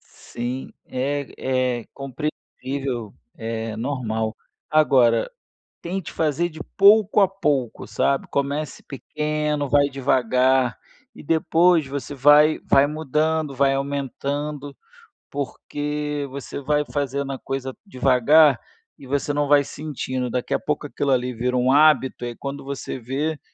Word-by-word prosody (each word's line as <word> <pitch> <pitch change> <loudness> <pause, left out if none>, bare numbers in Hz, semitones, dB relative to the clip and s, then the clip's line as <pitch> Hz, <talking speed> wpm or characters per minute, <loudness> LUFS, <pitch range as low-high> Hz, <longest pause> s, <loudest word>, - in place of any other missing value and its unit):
Sim, 125 +2 -7
é 130 -2 -1
é - - -13
compreensível, 135 -4 -5 0.2
é 115 -1 -4
normal, 110 -3 -2 0.3
agora, 135 - +4 0.5
tente 180 0 -4
fazer 160 +2 0
de 155 -1 -12 0.2
pouco 210 +1 +6
a 195 - +5
pouco, 145 - -1
sabe, 140 -1 0
comece 140 +1 -2
pequeno, 150 +1 -2
vai 145 0 +4
devagar 130 -1 +2 0.4
e - - -12
depois 165 0 +3
você 140 +1 -5
vai 145 +3 +5
vai 135 +1 +5
mudando, 155 0 -1
vai 135 +1 +3
aumentando, 140 +1 -3 0.5
porque 145 +1 -4
você 140 +1 -7
vai 150 +1 +1
fazendo 140 -1 -2
a 135 - -5
coisa 135 -1 -4
devagar 135 - +4 0.4
e 135 - -13
você 145 +1 -1
não 145 0 0
vai 145 0 +5
sentindo, 130 -4 -4
daqui 125 +1 -2
a - - +1
pouco, 150 0 -2
aquilo 140 -1 -1
ali 125 -1 +1
vira 125 +2 -1
um 125 +1 +3
hábito, 145 -4 +4
aí, 120 -1 -5
quando 140 0 -6
você 135 -1 -5
vê, 145 +6 -2
140 Hz, 125 wpm, -23 LUFS, 130-150 Hz, 0.5 s, pouco